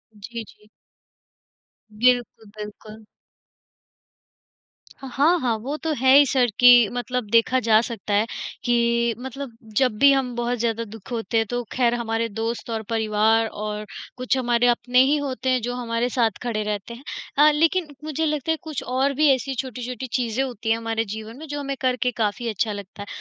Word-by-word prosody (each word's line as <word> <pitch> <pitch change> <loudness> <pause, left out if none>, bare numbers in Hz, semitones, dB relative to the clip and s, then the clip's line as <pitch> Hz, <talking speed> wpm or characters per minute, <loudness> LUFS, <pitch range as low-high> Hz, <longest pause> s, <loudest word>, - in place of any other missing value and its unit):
जी, 230 +2 -7
जी। 210 0 -20 1.3
बिल्कुल, 245 -1 +2
बिल्कुल। 215 +1 -10 2.0
ह 270 - -7
हाँ, 305 +8 +3
हाँ, 245 -6 0
वो 260 +7 -4
तो 320 - 0
है 260 +2 +4
ही 290 - +7
सर, 260 -2 +2
कि 245 -3 +8
मतलब 245 -2 -3
देखा 230 +3 +4
जा 220 -2 +4
सकता 225 -3 -5
है, 205 +2 +3 0.4
कि 235 -1 +2
मतलब 265 +1 -7 0.3
जब 250 -5 +2
भी 280 0 +7
हम 265 -2 0
बहुत 240 +1 -1
ज़्यादा 230 0 -1
दुख 225 +1 -12
होते 230 0 -1
हैं, 225 - +2
तो 245 0 -2
ख़ैर, 240 -2 +2
हमारे 230 -1 -1
दोस्त 225 +3 -4
और 225 -1 -2
परिवार 220 0 +2
और 210 0 -5 0.3
कुछ 255 +1 0
हमारे 240 -1 +2
अपने 245 +1 +2
ही 280 +3 +3
होते 265 -2 -3
हैं, 255 -2 +2
जो 245 +2 -3
हमारे 240 0 -1
साथ 230 -3 +2
खड़े 220 -3 -2
रहते 210 +2 -4
हैं। 245 - -12 0.3
अ, 300 +1 +7
लेकिन 325 +3 +2 0.2
मुझे 310 +1 -2
लगता 300 0 -1
है, 320 - 0
कुछ 310 -3 -5
और 265 +3 0
भी 300 +3 +3
ऐसी 265 +1 -3
छोटी-छोटी 250 0 -5
चीज़ें 250 0 0
होती 235 -4 -5
हैं, 225 - +3
हमारे 225 0 -2
जीवन 220 +3 -7
में, 315 - -9
जो 290 0 -4
हमें 275 -1 -3
करके 250 -1 +1
काफ़ी 220 +2 -1
अच्छा 215 +1 -1
लगता 200 0 -9
है। 205 - -7
240 Hz, 180 wpm, -23 LUFS, 225-260 Hz, 2.0 s, कि